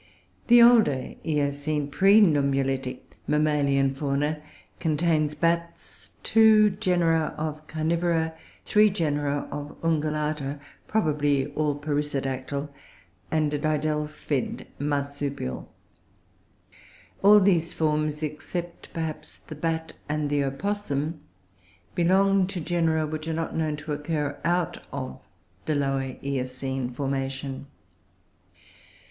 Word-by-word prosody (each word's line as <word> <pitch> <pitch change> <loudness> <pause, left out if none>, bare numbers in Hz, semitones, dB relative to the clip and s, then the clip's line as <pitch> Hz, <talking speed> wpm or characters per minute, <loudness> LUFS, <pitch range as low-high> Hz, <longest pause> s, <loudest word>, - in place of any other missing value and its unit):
The 240 0 +8
Older 220 - +4
Eocene 145 -1 -1
pre 195 +8 +5
nummulitic 135 -6 0
mammalian 145 -3 +2
Fauna 145 +2 -1 0.4
contains 155 -2 +1
Bats, 170 +2 -2
two 220 -1 +6
genera 175 -5 +1
of 155 0 -4
Carivora, 160 +1 0 0.3
three 210 0 +5
genera 145 -6 -1
of 145 0 -7
Ungulata 150 -3 -1 0.3
(probably 145 -7 +1
all 150 -1 0
perissodactyle), 145 -1 -2 0.6
and 155 -2 +1
a 150 - 0
didelphid 150 -2 -2
Marsupial; 140 - -3 1.5
all 210 +1 +8
these 175 -4 +2
forms, 155 -1 0
except 170 +3 -5
perhaps 155 -2 -5
the - - -11
Bat 160 +1 -2 0.2
and 150 -1 -1
the 145 -1 +2
Opossum, 155 0 -2 0.7
belong 190 +2 +3
to 195 -1 -4
genera 165 -2 +1
which 155 +1 -5
are 165 - -1
not 165 0 -3
known 155 -2 0
to 150 0 -5
occur 150 -1 -2
out 175 +1 0
of 65 - -5 0.5
the 155 - 0
Lower 135 -2 -1
Eocene 130 -1 -3
formation. 135 +1 -3
150 Hz, 100 wpm, -26 LUFS, 140-165 Hz, 1.5 s, The